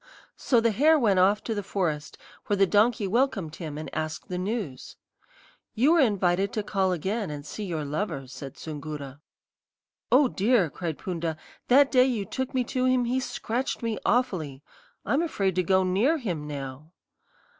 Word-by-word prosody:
"So 245 - +2
the 230 0 +2
hare 305 +9 +4
went 205 -9 +3
off 200 +3 +3
to 225 - -2
the 205 - -2
forest, 165 -7 -3 0.3
where 205 - +1
the 195 - +5
donkey 210 +2 +3
welcomed 195 - 0
him 155 -4 -6
and 155 0 -5
asked 155 0 -4
the 180 -1 -3
news. 190 - -4 0.8
"'You 270 +9 +4
are 335 - +5
invited 195 -5 +2
to 215 - -1
call 195 -2 0
again 190 +4 -2
and 145 -1 -6
see 205 +8 -6
your 160 -5 -3
lover,' 145 -2 -3
said 135 +1 -9
Soongoora. 145 -3 -7 0.9
"'Oh, 270 +2 +6
dear!' 205 - +2
cried 165 -2 -4
Poonda; 165 -3 -3 0.3
'that 275 +2 +5
day 255 -1 +6
you 235 -6 -1
took 260 +6 -4
me 255 - +2
to 255 +1 -1
him 255 -1 +3
he 250 +2 0
scratched 245 0 -3
me 225 -2 -2
awfully. 160 - 0 0.4
I'm 260 +10 +2
afraid 200 - 0
to 185 - +1
go 190 +1 +3
near 205 - +2
him 175 - -4
now.' 140 +2 -7
195 Hz, 175 wpm, -26 LUFS, 155-240 Hz, 0.9 s, Oh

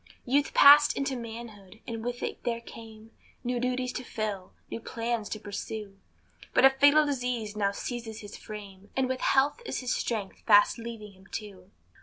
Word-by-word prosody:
Youth 280 +3 +1
passed 290 +1 +8
into 275 -1 -1
manhood, 225 -4 -9
and 225 -1 -5
with 245 0 -4
it - - -4
there 235 -1 -1
came 225 -1 -12 0.3
New 245 0 -1
duties 250 0 -1
to 255 - -4
fill, 210 -5 -4 0.2
new - - -4
plans 230 -2 -3
to 215 - -4
pursue; 205 0 -6 0.6
But - - +6
a 270 - +8
fatal 285 +3 +5
disease 245 -6 -2
now 200 -2 +1
seizes 225 +1 -6
his 205 -1 -9
frame, 200 -2 -10
And 265 -1 +2
with 260 0 -3
health 280 - +2
is 465 - -3
his 250 - -1
strength 215 -5 -3
fast 205 +2 +6
leaving 225 -3 -7
him 190 0 -19
too. 195 -4 -8
230 Hz, 175 wpm, -28 LUFS, 210-250 Hz, 0.6 s, passed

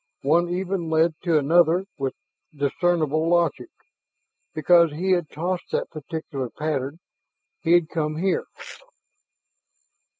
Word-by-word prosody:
One 170 +5 +3
even 180 -1 -2
led 160 +1 +3
to 165 -3 +3
another 170 +4 +3
with 135 -1 -2 0.4
discernible 155 +2 0
logic; 175 - +1 0.8
because 170 +1 +4
he 185 +5 -1
had 175 -4 +1
tossed 175 +3 -3
that - - -1
particular 150 -4 -5
pattern 145 0 -3 0.6
he 170 0 +2
had 175 -2 +4
come 155 -2 -2
here. 190 +3 0
165 Hz, 110 wpm, -24 LUFS, 150-175 Hz, 0.8 s, because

